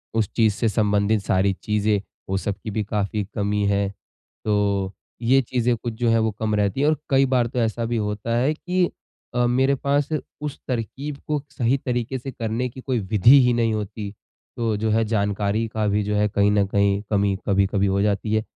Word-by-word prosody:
उस 110 -4 +1
चीज़ 110 -3 +3
से 115 +1 0
संबंधित 105 0 +2
सारी 95 +1 +2
चीज़ें 105 -1 +1 0.3
वो 95 - 0
सबकी 105 +1 -4
भी 110 0 -1
काफ़ी 105 0 -2
कमी 105 0 0
है, 100 -1 +1 0.6
तो 100 -2 +1 0.3
ये 130 +3 +4
चीज़ें 125 -1 0
कुछ 115 0 -5
जो 120 +1 0
हैं 115 - +4
वो 110 -1 +1
कम 110 -1 0
रहती 105 +5 0
है। 145 - +3
और 155 - +3
कई 135 0 +4
बार 125 -3 +2
तो 125 +1 -3
ऐसा 115 0 0
भी 115 0 -1
होता 105 +2 -2
है 135 +5 +2
कि 180 +2 0 0.5
अ, 120 0 +3
मेरे 130 +3 +2
पास 140 +2 0 0.3
उस 150 -2 -5
तरक़ीब 135 +4 -4
को 150 -1 0
सही 130 -1 +1
तरीक़े 125 +1 -1
से 135 +2 -6
करने 115 +2 -2
की 130 +2 -11
कोई 125 -3 -1
विधि 110 +7 +6
ही 125 - +3
नहीं 115 -2 +1
होती, 105 -1 -4 0.5
तो 115 -2 0
जो 110 +1 -1
है 110 +1 +3
जानकारी 105 +1 0
का 110 -1 -2
भी 105 +1 +1
जो 105 +1 -1
है 105 0 +3
कहीं 100 0 +2
न 100 -1 +3
कहीं 100 0 +2
कमी 100 -1 +2
कभी-कभी 100 0 +2
हो 100 +1 +1
जाती 105 +1 0
है। 110 0 +2
110 Hz, 205 wpm, -23 LUFS, 100-120 Hz, 0.6 s, विधि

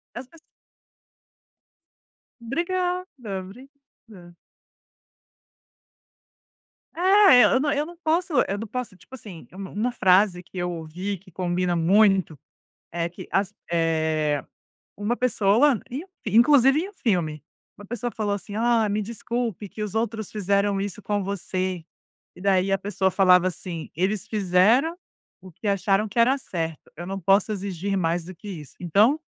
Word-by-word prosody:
as 245 +1 -7
pes 330 +4 -19 2.0
Obrigada, 360 +7 -2 0.3
obrigada. 215 -4 -15 2.6
É, 375 - +6
eu - - +4
eu 260 - +3
não 290 0 0
eu 295 +1 0
não 345 +1 -12
posso 335 +2 0
eu 200 - -2
não 225 +1 -6
posso, 245 -3 -5
tipo 185 - -21
assim, 195 -9 -11
u - - -14
uma 205 +5 -3
frase 185 -3 +3
que 180 +1 -14
eu 175 0 -2
ouvi, 175 +5 -5
que 185 +1 -20
combina 180 0 -1
muito, 190 -2 +3 0.5
é 170 0 -1
que 180 +1 -11
as 195 +1 0 0.2
eh, 160 -3 0 0.5
uma 210 +4 -1
pessoa 235 +2 +3
e 270 +6 -4 0.2
inclusive 265 +6 +5
em 380 - -4
um - - -14
filme, 170 - -1 0.3
uma 205 - -12
pessoa 240 +2 -4
falou 205 -2 -1
assim: 205 +1 -7
"Ah, 230 -1 +2
me 210 +1 -1
desculpe 230 -2 -4
que 215 - -7
os 210 0 -4
outros 220 -2 -2
fizeram 200 -1 0
isso 200 +1 -5
com 205 -1 -1
você". 185 -3 -3 0.5
E - - -13
daí 195 0 +2
a 195 - +2
pessoa 195 -1 0
falava 185 -1 +5
assim: 170 -2 -7
"Eles 195 +3 -1
fizeram 215 - +3 0.4
o 185 0 -13
que 210 - -9
acharam 200 +2 +1
que 230 +3 -5
era 255 +4 +4
certo, 165 - -5
eu 175 +1 -7
não 195 0 -4
posso 195 +4 +3
exigir 195 -1 -3
mais 170 -1 0
do 185 +1 -9
que 205 +5 -12
isso". 155 -7 -9
Então, 210 - +3
200 Hz, 150 wpm, -24 LUFS, 180-235 Hz, 2.6 s, É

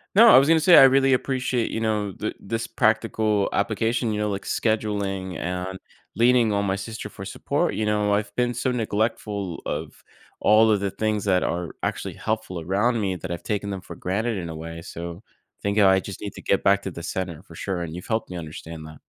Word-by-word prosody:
No, 230 +3 +9
I - - +9
was 135 - +5
gonna 160 0 +5
say 175 +2 +7
I - - +10
really 135 0 +5
appreciate, 130 -2 0
you 115 - -3
know, 105 -3 -1
the 110 - -4
this 115 +3 -3
practical 110 -2 +1
application, 115 +3 0
you 105 - -2
know, 105 - 0
like 100 -1 -3
scheduling 100 -5 -1
and 90 +2 -4 0.4
leaning 120 -1 +4
on 100 - +1
my 95 -1 0
sister 110 +3 -6
for - - -9
support, - - -1
you 110 - -1
know, 105 -1 +1
I've 105 +1 -1
been 120 0 +1
so 125 +2 -1
neglectful 105 -5 -2
of - - -5 0.3
all 110 +1 +5
of 105 - +3
the 100 0 -1
things 110 0 -1
that 95 -2 +3
are 85 -1 -3
actually - - -2
helpful 110 -5 -3
around 105 +7 +1
me 95 -2 -1
that 90 +2 -7
I've 85 -1 -5
taken 100 -1 -2
them 95 -2 -5
for - - -10
granted 110 +4 -1
in 85 - -4
a 80 - -6
way. 80 +1 -7
So, 85 +2 -7 0.4
think 100 +1 0
I 95 -2 +6
just 95 0 -8
need 105 - -4
to - - -9
get 100 - +1
back 100 0 +3
to 95 - -4
the 85 0 -8
center 90 -2 -4
for - - -15
sure, 95 -3 -3
and 80 -2 -5
you've 90 +1 -8
helped 110 0 -1
me 90 - -6
understand 80 0 -8
that. 75 - -12
105 Hz, 220 wpm, -24 LUFS, 95-110 Hz, 0.4 s, I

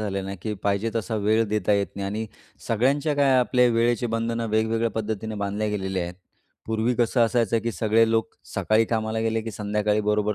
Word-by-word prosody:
झालेलं 100 -2 -2
नाही 95 0 -5
की 110 - -2
पाहिजे 100 +3 0
तसा 115 0 -2
वेळ 110 +2 +3
देता 105 -1 +1
येत 100 -1 +2
नाही 100 0 -3
आणि 110 +3 -3 0.4
सगळ्यांच्या 140 +6 +1
काय 140 -2 +3
आपले 125 0 +3
वेळेची 120 +1 +1
बंधनं 115 0 -1
वेगवेगळ्या 110 +1 +1
पद्धतीने 110 0 -3
बांधल्या 105 +2 -1
गेलेल्या 95 -3 -2
आहेत. 85 +1 -5 0.5
पूर्वी 110 +2 0
कसं 120 +1 +2
असायचं 115 -1 +1
की 115 - -2
सगळे 110 +1 +2
लोक 115 0 +1 0.3
सकाळी 110 +1 +2
कामाला 110 0 -1
गेले, 115 0 0
की 115 - -5
संध्याकाळी 105 0 0
बरोबर 105 0 +1
110 Hz, 185 wpm, -24 LUFS, 105-115 Hz, 0.5 s, वेळ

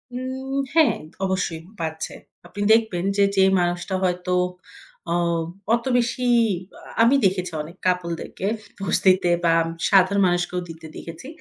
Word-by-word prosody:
উম 260 +1 -4 0.2
হ্যাঁ, 320 -2 +5 0.3
অবশ্যই 185 -4 -2 0.2
পাচ্ছে। 160 -1 -4 0.3
আপনি 205 - -7
দেখবেন 220 -6 +1
যে, 200 - +5
যে 190 - +5 0.2
মানুষটা 175 +2 -1
হয়তো 180 0 0 0.8
অ - - +2 0.6
অত 235 +1 +1
বেশি 245 +1 -1 0.5
আ - - -13 0.2
আমি 235 +4 +5
দেখেছি 180 -1 0
অনেক 165 +4 -10
কাপল 180 -1 +1
দেরকে 195 - -5 0.4
বস্তিতে 185 -1 +3
বা 165 -1 +4 0.4
সাধারণ 195 0 +4
মানুষকেও 175 0 0
দিতে 165 0 -10
দেখেছি। 165 +9 -9
185 Hz, 130 wpm, -23 LUFS, 175-210 Hz, 0.8 s, হ্যাঁ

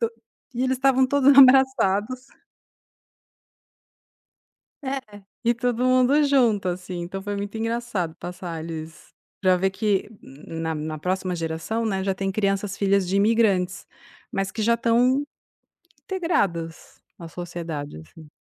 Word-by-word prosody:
to 230 - 0 0.4
e 245 - -1
eles 260 0 +1
estavam 265 0 +4
todos 280 0 +4
abraçados. 255 -3 +5 2.6
É, 260 -7 -5 0.2
e 235 - +4
todo 245 0 -1
mundo 255 +3 +4
junto, 240 -8 +2
assim. 180 0 -4
Então 185 +3 -5
foi 205 0 -4
muito 200 +1 -5
engraçado 225 -7 -2
passar 175 -2 -7
eles 160 -1 -8 0.3
pra 185 -2 +4
vê 190 +2 +1
que 200 0 0
na 160 +4 -6
na 155 0 -4
próxima 185 +2 -2
geração, 165 +8 -3
né, 195 -4 -1
já 195 0 0
tem 195 0 -2
crianças, 195 -1 -1
filhas 200 -2 +2
de 190 - 0
imigrantes, 200 -3 +2 0.5
mas 195 0 -1
que 220 - -4
já 235 +2 +3
estão 245 +4 +2 0.8
integradas, 195 - -2 0.2
à 170 - -9
sociedade, 165 - -6
assim. 150 - -15
200 Hz, 130 wpm, -24 LUFS, 175-240 Hz, 2.6 s, abraçados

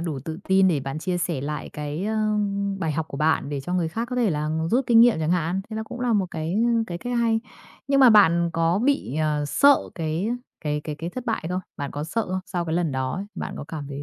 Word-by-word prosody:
đủ 160 -5 -3
tự 160 0 -5
tin 190 0 +5
để 155 -5 +1
bạn 135 +3 -4
chia 180 +1 -2
sẻ 170 -5 -1
lại 150 +1 -4
cái, 150 +4 -4
a, 215 0 0 0.5
bài 160 -4 -1
học 160 +1 -3
của - - -7
bạn 150 -1 +1
để 145 -2 -3
cho 175 +6 -4
người 175 -3 +1
khác 225 +8 -3
có 250 - -2
thể 235 -5 +2
là 150 -1 -1 0.2
rút 255 +2 +2
kinh 230 -1 +6
nghiệm 235 -7 +6
chẳng 155 0 0
hạn. 180 +1 0
Thế 220 - -4
là 220 - -2
cũng 245 +2 -8
là 245 -2 +1
một 200 -3 +2
cái, 160 +1 -3
ơ, 230 +4 +2 0.2
cái 175 -1 -5
cách 245 +3 -3
hay. 225 -1 +2 0.5
Nhưng 275 0 +4
mà 255 -3 +8
bạn 170 -5 +5
có 165 +2 +2
bị, 250 - 0
ờ, 150 -1 0
sợ 280 - +5 0.2
cái 165 +4 -2 0.4
cái 150 0 -1
cái 155 -2 -4
cái 165 +3 -5
thất 250 +3 -6
bại 225 -8 -1
không? 180 +1 -1 0.2
Bạn 140 -2 -4
có 145 +1 -4
sợ 225 +8 -1
không? 185 +1 -1
Sau 180 -3 -2
cái 160 -1 -2
lần 170 -4 0
đó 130 0 -1
ấy, 195 +3 -4
bạn - - -5
có - - -6
cảm 150 -4 -6
thấy 140 0 -6
170 Hz, 270 wpm, -24 LUFS, 155-220 Hz, 0.5 s, mà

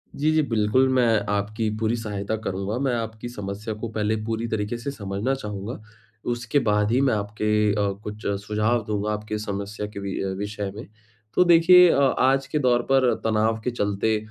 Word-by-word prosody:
जी, 155 +2 +1
जी। 155 0 +3
बिल्कुल, 115 0 +2
मैं 120 -4 +3 0.2
आपकी 110 +2 -1
पूरी 110 +1 0
सहायता 105 -2 -3
करूँगा। 100 +2 -2
मैं 135 -2 0
आपकी 110 0 -5
समस्या 105 -1 -5
को 110 +2 -5
पहले 110 0 0
पूरी 115 +1 -2
तरीके 110 +1 -2
से 125 +4 -4
समझना 105 +1 -2
चाहूँगा, 105 -2 -6 0.5
उसके 120 +4 0
बाद 105 -3 +1
ही 125 +3 +3
मैं 135 -4 +3
आपके 105 0 0
अ, 100 -1 +1
कुछ 105 +1 -8 0.2
सुझाव 110 +3 +1
दूँगा 105 0 -1
आपकी 105 0 -4
समस्या 100 0 -4
के 105 -1 -8
वि 100 -1 -4
अ, 95 - -1
विषय 105 0 -4
में। 110 - -8 0.5
तो - - +5
देखिए 175 +1 +7
अ, - - +2 0.2
आज 135 +1 +3
के 150 +2 -1
दौर 125 -3 +3
पर 130 -2 +4
तनाव 110 0 +1
के 125 - -1
चलते 105 -1 0
110 Hz, 185 wpm, -24 LUFS, 105-120 Hz, 0.5 s, देखिए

